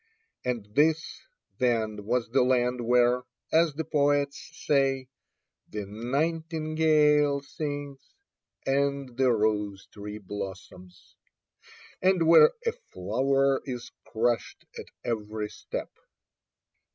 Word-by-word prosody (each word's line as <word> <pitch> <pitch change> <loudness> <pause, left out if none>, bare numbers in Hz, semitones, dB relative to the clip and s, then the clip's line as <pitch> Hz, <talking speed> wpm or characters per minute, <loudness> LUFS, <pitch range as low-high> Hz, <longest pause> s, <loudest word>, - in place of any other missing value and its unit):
And 120 -4 -2
this, 155 +4 +1 0.4
then, 110 -5 0
was 120 +2 0
the 135 +1 +4
land 125 -1 +2
where, 125 0 +4 0.3
as 160 -2 +3
the 160 - -2
poets 145 -1 0 0.2
say, 135 -2 +2 0.6
"the 105 -1 -5
nightingale 150 - +1
sings, 145 -2 -5 0.7
and 140 -2 0
the 130 0 +3
rose 105 -3 0
tree 105 0 -8
blossoms," 95 -2 -9 0.9
and 185 -2 +3
where 170 - +8 0.2
"a 465 - +2
flower 135 - 0
is 125 -3 -6 0.2
crushed 120 +1 -1
at - - -8 0.2
every 105 -2 -3
step!" - - -6
130 Hz, 100 wpm, -27 LUFS, 110-145 Hz, 0.9 s, where